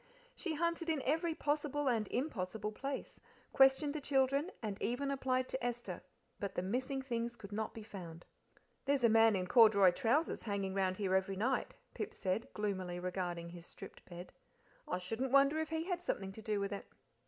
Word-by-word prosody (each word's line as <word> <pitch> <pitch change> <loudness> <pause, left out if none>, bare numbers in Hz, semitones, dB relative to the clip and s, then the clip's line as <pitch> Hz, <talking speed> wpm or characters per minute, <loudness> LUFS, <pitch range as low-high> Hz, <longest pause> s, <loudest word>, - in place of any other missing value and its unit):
She 335 -4 -3
hunted 335 +1 0
in 305 -5 0
every 320 +3 +1
possible 290 -1 0
and 225 -4 +2
impossible 215 -5 -2
place, 275 +5 -5 0.3
questioned 270 +2 +5
the 305 - -4
children, 275 +3 +2
and 210 -3 -4
even 275 +4 0
applied 255 -1 0
to 260 - -3
Esther, 240 0 -3 0.4
but 200 - -4
the 180 - -1
missing 260 +7 -1
things 235 -2 -2
could 210 -3 -11
not 220 +1 -3
be 225 - -7
found. 175 -6 -9 0.6
"There's 275 -2 +2
a 235 - +7
man 225 -1 +6
in 185 -1 0
corduroy 200 -2 +7
trousers 260 - +1
hanging 200 -3 -2
round 190 -1 +1
here 195 -3 0
every 190 +1 +2
night," 245 +7 0 0.2
Pip - - -4
said, 190 +4 -2
gloomily 185 -4 -2
regarding 175 -2 -3
his 175 0 -10
stripped - - -11
bed. 175 0 -9 0.5
"I - - -1
shouldn't 225 +8 -3
wonder 275 +3 +5
if 315 - -2
he 320 0 -1
had 355 0 -2
something 195 - -2
to 220 - -10
do 210 -1 -1
with 200 0 -2
it." 200 - -5
230 Hz, 185 wpm, -35 LUFS, 195-275 Hz, 0.6 s, a